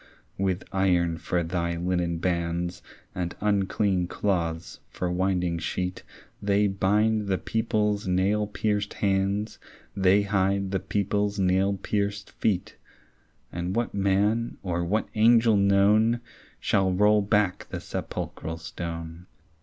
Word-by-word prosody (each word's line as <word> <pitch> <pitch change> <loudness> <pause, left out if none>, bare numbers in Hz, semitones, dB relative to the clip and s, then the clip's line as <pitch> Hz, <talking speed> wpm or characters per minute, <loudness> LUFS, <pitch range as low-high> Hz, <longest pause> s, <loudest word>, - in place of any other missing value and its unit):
With 95 -1 0
iron 90 -4 +1
for 85 +2 -1
thy 85 0 -2
linen 90 -1 -1
bands 85 0 -2 0.3
And 90 -1 -3
unclean 100 -2 +1
cloths 85 -4 -2
for 90 -1 -3
winding 90 -2 0
sheet 90 +2 -3 0.4
They 100 0 +2
bind 105 +2 +1
the 95 -1 +1
people's 105 -2 -1
nail 100 +3 +1
pierced 105 -1 -1
hands, 100 +2 0 0.4
They 95 +1 +4
hide 100 -1 0
the 95 - 0
people's 100 +2 -1
nail 95 +1 +2
pierced 100 +1 -2
feet; 95 -5 -1 0.7
And 90 +2 -3
what 120 0 -1
man 100 +4 +1
or 85 -2 -1
what 105 +6 0
angel 115 0 +5
known 105 +4 +4 0.4
Shall 95 -1 +2
roll 105 +3 +4
back 100 -2 +1
the - - -4
sepulchral 80 +1 -5
stone? 85 +1 -7
95 Hz, 120 wpm, -26 LUFS, 90-105 Hz, 0.7 s, angel